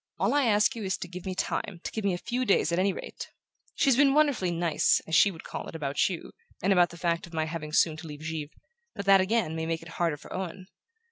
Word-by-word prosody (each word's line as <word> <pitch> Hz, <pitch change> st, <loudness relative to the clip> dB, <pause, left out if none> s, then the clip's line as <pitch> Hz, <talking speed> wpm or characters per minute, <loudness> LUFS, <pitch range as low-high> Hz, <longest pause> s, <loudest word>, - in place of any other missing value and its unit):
All -, -, +1 dB
I 290 Hz, -2 st, +3 dB
ask 210 Hz, -1 st, +3 dB
you 225 Hz, -, -5 dB
is 190 Hz, -1 st, -1 dB
to -, -, -6 dB
give 180 Hz, +1 st, -8 dB
me 185 Hz, -, -3 dB
time, 185 Hz, 0 st, -3 dB
to -, -, -4 dB
give 220 Hz, -, -4 dB
me 195 Hz, -3 st, +1 dB
a -, -, -4 dB
few 245 Hz, +7 st, -2 dB
days 195 Hz, -7 st, +2 dB
at 170 Hz, -, +1 dB
any 195 Hz, +1 st, +3 dB
rate -, -, -8 dB, 0.5 s
She's 270 Hz, -4 st, +3 dB
been 275 Hz, +1 st, +4 dB
wonderfully 285 Hz, -12 st, +3 dB
'nice,' 170 Hz, -2 st, +2 dB
as 160 Hz, -, -8 dB
she 190 Hz, +4 st, +6 dB
would 165 Hz, -5 st, -9 dB
call -, -, -6 dB
it, -, -, -9 dB
about 145 Hz, 0 st, 0 dB
you, 175 Hz, -3 st, -6 dB, 0.3 s
and 195 Hz, +2 st, +2 dB
about 175 Hz, -2 st, +4 dB
the 170 Hz, -, -11 dB
fact 170 Hz, +2 st, -1 dB
of 170 Hz, -, -11 dB
my 160 Hz, 0 st, 0 dB
having 155 Hz, -1 st, -5 dB
soon 155 Hz, 0 st, +3 dB
to 160 Hz, +1 st, -9 dB
leave 150 Hz, -1 st, -9 dB
Givre; 155 Hz, -2 st, -4 dB, 0.5 s
but 200 Hz, -, -5 dB
that, 195 Hz, -1 st, +6 dB
again, 190 Hz, -4 st, 0 dB
may 160 Hz, 0 st, -3 dB
make 165 Hz, 0 st, -2 dB
it 170 Hz, -, -11 dB
harder 165 Hz, -4 st, +1 dB
for -, -, -11 dB
Owen. 185 Hz, 0 st, -5 dB
175 Hz, 265 wpm, -28 LUFS, 165-200 Hz, 0.5 s, she